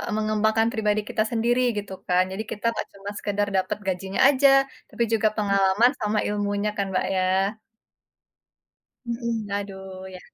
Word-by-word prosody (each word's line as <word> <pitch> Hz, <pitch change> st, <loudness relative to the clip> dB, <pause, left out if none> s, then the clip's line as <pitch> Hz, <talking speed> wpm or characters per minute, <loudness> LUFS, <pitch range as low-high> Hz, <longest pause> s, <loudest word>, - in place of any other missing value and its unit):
mengembangkan 215 Hz, +1 st, +2 dB
pribadi 215 Hz, -2 st, +1 dB
kita 215 Hz, -, +1 dB
sendiri, 240 Hz, +2 st, +2 dB, 0.2 s
gitu 200 Hz, -1 st, -5 dB
kan. 180 Hz, 0 st, +4 dB
Jadi 190 Hz, +3 st, -4 dB
kita 210 Hz, -, -6 dB
nggak -, -, -4 dB
cuma 200 Hz, 0 st, -8 dB
sekedar 205 Hz, -1 st, -1 dB
dapat 185 Hz, 0 st, -1 dB
gajinya 190 Hz, +1 st, -2 dB
aja, 280 Hz, 0 st, +4 dB, 0.4 s
tapi 235 Hz, -, -1 dB
juga 220 Hz, -1 st, +3 dB
pengalaman 200 Hz, +3 st, +3 dB
sama 210 Hz, 0 st, 0 dB
ilmunya 205 Hz, 0 st, -1 dB
kan, 200 Hz, -, 0 dB
Mbak, 185 Hz, -, 0 dB
ya? 190 Hz, +2 st, +1 dB, 1.5 s
Mhm, 235 Hz, -3 st, -3 dB
aduh, 190 Hz, -2 st, -6 dB
ya. -, -, -9 dB
205 Hz, 145 wpm, -24 LUFS, 195-220 Hz, 1.5 s, kan